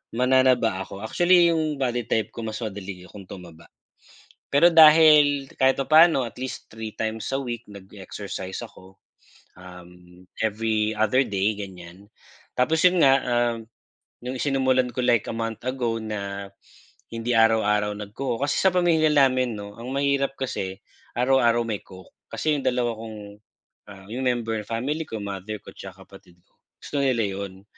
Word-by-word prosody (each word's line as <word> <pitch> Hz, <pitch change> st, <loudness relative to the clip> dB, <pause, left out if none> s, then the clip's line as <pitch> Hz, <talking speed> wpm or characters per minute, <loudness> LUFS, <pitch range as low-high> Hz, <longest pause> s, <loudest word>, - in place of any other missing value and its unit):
mananaba 125 Hz, -5 st, +3 dB
ako. 100 Hz, +2 st, -8 dB
Actually 175 Hz, +7 st, +4 dB
yung 155 Hz, -2 st, -1 dB
body 120 Hz, -3 st, -2 dB
type 110 Hz, -2 st, -1 dB
ko 115 Hz, -, -8 dB
mas 110 Hz, 0 st, -5 dB
madali 100 Hz, -3 st, -7 dB
akong 95 Hz, 0 st, -13 dB
tumaba. 85 Hz, -3 st, -12 dB, 0.8 s
Pero 145 Hz, +5 st, +6 dB
dahil 155 Hz, -3 st, +6 dB
kahit 135 Hz, +1 st, +3 dB
papaano 155 Hz, -2 st, +5 dB
at 115 Hz, -, -12 dB
least 130 Hz, 0 st, -6 dB
3 110 Hz, -1 st, -8 dB
times 110 Hz, +2 st, -3 dB
a 135 Hz, -, 0 dB
week 120 Hz, -3 st, -5 dB
nag-e-exercise 95 Hz, -1 st, -8 dB
ako. 95 Hz, +1 st, -13 dB, 0.6 s
Uhm 90 Hz, 0 st, -15 dB, 0.2 s
every 110 Hz, 0 st, 0 dB
other 110 Hz, +5 st, +3 dB
day 105 Hz, -1 st, 0 dB
ganyan. 95 Hz, 0 st, -10 dB, 0.5 s
Tapos 160 Hz, +5 st, +2 dB
yun 180 Hz, 0 st, +5 dB
nga 135 Hz, -, +6 dB
uhm, 120 Hz, -1 st, 0 dB, 0.7 s
nung 130 Hz, +1 st, -4 dB
sinumulan 130 Hz, -2 st, +1 dB
ko 125 Hz, -, -2 dB
like 120 Hz, -4 st, +2 dB
a -, -, -3 dB
month 115 Hz, -1 st, -4 dB
ago 125 Hz, -3 st, -2 dB
na 100 Hz, -2 st, -5 dB, 0.6 s
hindi 115 Hz, +1 st, -4 dB
araw-araw 105 Hz, -2 st, +3 dB
nagco-coke. 115 Hz, +5 st, -4 dB
Kasi -, -, 0 dB
sa 190 Hz, -1 st, +3 dB
pamilya 165 Hz, -3 st, +3 dB
namin 130 Hz, -4 st, +2 dB
no 100 Hz, 0 st, -9 dB
ang 120 Hz, -, -7 dB
mahirap 140 Hz, 0 st, 0 dB
kasi 95 Hz, -8 st, -4 dB, 0.4 s
araw-araw 120 Hz, -2 st, +3 dB
may 110 Hz, -3 st, -4 dB
coke. 95 Hz, -1 st, -15 dB, 0.2 s
Kasi 155 Hz, -2 st, 0 dB
yung 135 Hz, -, -9 dB
dalawa 125 Hz, -2 st, 0 dB
kong 110 Hz, -1 st, -8 dB, 0.7 s
ah 95 Hz, -1 st, -12 dB
yung 130 Hz, +3 st, -4 dB
member, 115 Hz, -3 st, -1 dB
family 135 Hz, +8 st, -2 dB
ko, 110 Hz, -, -6 dB
mother 100 Hz, +2 st, -6 dB
ko, -, -, -11 dB
tsaka 95 Hz, 0 st, -11 dB
kapatid 95 Hz, -3 st, -17 dB
ko, -, -, -40 dB, 0.2 s
gusto 145 Hz, -, -4 dB
nila 125 Hz, -4 st, +1 dB
yun. 95 Hz, -1 st, -6 dB
115 Hz, 155 wpm, -24 LUFS, 100-135 Hz, 0.8 s, Pero